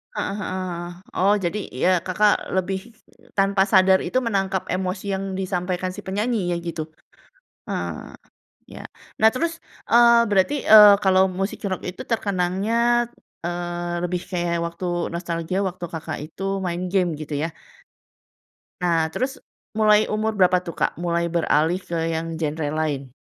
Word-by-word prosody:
Heeh - - -2
heeh, 185 -3 -4 0.4
oh, 200 +2 +5
jadi, 195 +2 -2
ya, 180 +7 +1
Kakak 205 +4 +1
lebih 190 +1 -1 0.6
tanpa 195 0 +3
sadar 190 -1 +5
itu - - -2
menangkap 195 -3 -1
emosi 185 +2 -2
yang 190 0 -3
disampaikan 185 -1 -2
si - - -8
penyanyinya 195 -3 -1
gitu? 165 -2 -5 0.8
Ah. - - -5 0.5
Ya. - - -10 0.3
Nah 220 +1 +5
terus, 335 +5 -3 0.2
eee, 235 -1 +6
berarti, 205 +9 +2
eee, 210 -3 +9
kalau 190 -1 +4
musik 195 +2 -3
rock 185 -2 -2
itu 180 - -6
terkenangnya, 225 +4 +1 0.3
eee, 175 0 -3
lebih 180 0 -1
kayak 175 -2 -1
waktu 175 +1 -2
nostalgia 170 +2 -2
waktu 180 -1 -4
Kakak 160 -1 -5
itu 195 +4 -3
main 175 -1 -3
game 180 -4 +2
gitu, 155 0 -8
ya. 160 +3 -1 1.3
Nah 165 -2 +1
terus 265 +2 -2 0.4
mulai 215 -1 +5
umur 215 +1 0
berapa, 185 -1 +5
tuh, 170 - -5
Kak, - - +1
mulai 170 0 0
beralih 165 0 +2
ke 170 -2 -4 0.2
yang 165 0 -4
genre 155 0 -2
lain? 145 -4 -2
185 Hz, 140 wpm, -23 LUFS, 170-200 Hz, 1.3 s, eee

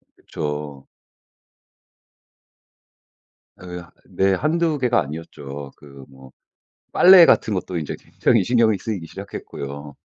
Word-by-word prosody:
그쵸. 75 -2 -6 2.8
예. 90 -1 -8 0.2
네. 95 0 +1
1-2 155 - 0
개가 125 -5 +2
아니었죠. 70 -2 -8
그 70 -2 -14
뭐 65 -1 -16 0.6
빨래 180 -1 +8
같은 110 - +3
것도 90 -1 -3
인제 75 - -4
굉장히 115 -5 +1
신경이 115 -3 +2
쓰이기 100 -7 -5
시작했고요. 70 0 -8
85 Hz, 205 characters per minute, -21 LUFS, 70-115 Hz, 2.8 s, 빨래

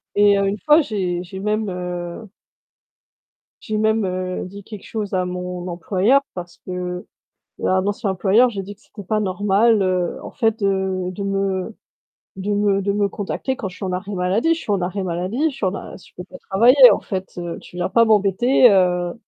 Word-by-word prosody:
Et 205 -1 +5
heu, 200 0 +1
une 200 +2 -1
fois, 305 +2 +6
j'ai 185 -8 -2
j'ai 190 +2 -9
même 210 0 -1
heu 180 +3 -6 1.3
j'ai 215 -1 -3
même, 220 -1 +1
heu, 185 0 -3
dit 200 +2 -10
quelque 210 -2 -10
chose 210 -3 -4
à 185 -1 +1
mon 180 0 -5
employeur 190 +9 +2
parce 175 -1 -8
que 180 0 -5 0.6
à - - +1
un 185 - 0
ancien 205 0 -1
employeur 205 +6 +3
j'ai 195 -4 -5
dit 205 +2 -9
que: - - -32
«C'était 205 - -12
pas 215 +3 0
normal, 205 +2 +2
heu, 185 -2 0
en - - -8
fait, 225 -4 0
de 190 -2 0
de 200 +2 -6
me 195 +1 -2 0.6
de 195 +2 -4
me 200 -1 +2
de 200 +1 0
me 205 -1 +1
contacter 230 +7 -4
quand 205 -8 -4
je 180 - -12
suis - - -6
en 185 - -2
arrêt 190 +3 -4
maladie. 195 - +1
Je 330 - -7
suis - - -6
en 195 - +1
arrêt 190 +2 -2
maladie, 185 - -1
je - - -12
suis 195 - -1
en 185 - -1
a - - -8
je - - -18
peux 180 - -7
pas - - -13
travailler, 245 +6 +7
en - - 0
fait, 190 -2 -5
heu, 175 -1 -5
tu 180 - -14
viens 180 +1 -1
pas 230 -1 +5
m'embêter, 220 +4 +4
heu.» 180 -2 +2
195 Hz, 210 wpm, -21 LUFS, 180-215 Hz, 1.3 s, travailler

